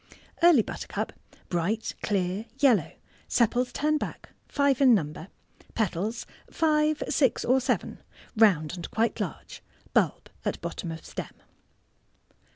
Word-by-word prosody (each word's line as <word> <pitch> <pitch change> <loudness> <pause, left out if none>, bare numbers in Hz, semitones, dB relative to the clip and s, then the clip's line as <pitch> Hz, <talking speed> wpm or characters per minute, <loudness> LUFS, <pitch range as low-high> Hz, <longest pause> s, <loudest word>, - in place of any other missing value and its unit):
Early 335 -9 +7
Buttercup.— - - -5 0.4
Bright, 190 +6 -1
clear 195 +1 -1
yellow 270 -6 +3 0.3
sepals 245 +1 +2
turn 305 +1 +1
back— - - -6 0.2
five 280 -1 +2
in 255 -4 +7
number— 155 -2 -3 0.5
petals 215 +2 -1 0.2
five, 310 -1 +2
six, 265 -5 +2
or 260 +2 +3
seven— 255 0 -1 0.3
round 185 -9 +4
and 175 - -7
quite 230 +1 0
large— - - -5 0.3
bulb - - +1
at - - -2
bottom 170 -5 -5
of 160 0 -8
stem. - - -7
230 Hz, 120 wpm, -27 LUFS, 185-275 Hz, 0.5 s, Early